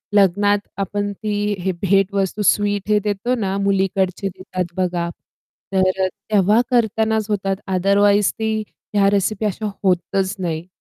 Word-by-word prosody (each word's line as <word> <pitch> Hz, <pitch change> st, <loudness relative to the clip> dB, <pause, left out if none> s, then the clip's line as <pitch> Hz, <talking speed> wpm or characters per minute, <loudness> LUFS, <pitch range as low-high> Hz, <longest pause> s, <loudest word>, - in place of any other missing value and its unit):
लग्नात 205 Hz, +1 st, +4 dB, 0.2 s
आपण 205 Hz, +1 st, -2 dB
ती 205 Hz, 0 st, -2 dB
हे 190 Hz, -, +1 dB
भेटवस्तू, 195 Hz, +1 st, +1 dB
स्वीट 205 Hz, 0 st, +1 dB
हे 210 Hz, 0 st, +4 dB
देतो 210 Hz, +4 st, -1 dB
ना, 195 Hz, -2 st, -1 dB
मुलीकडचे 195 Hz, 0 st, 0 dB
देतात 185 Hz, -1 st, -5 dB
बघा. 175 Hz, -2 st, -1 dB, 0.6 s
तर 190 Hz, 0 st, +2 dB
तेव्हा 205 Hz, +2 st, +2 dB
करतानाच 220 Hz, -2 st, +1 dB
होतात 195 Hz, -2 st, 0 dB, 0.2 s
अदरवाईज 200 Hz, +2 st, +3 dB
ती 220 Hz, 0 st, 0 dB, 0.4 s
ह्या 200 Hz, -1 st, +4 dB
रेसिपी 205 Hz, +1 st, 0 dB
अशा 210 Hz, +1 st, -2 dB
होतच 190 Hz, +1 st, +1 dB
नाही. 170 Hz, -2 st, -3 dB
200 Hz, 130 wpm, -20 LUFS, 190-205 Hz, 0.6 s, लग्नात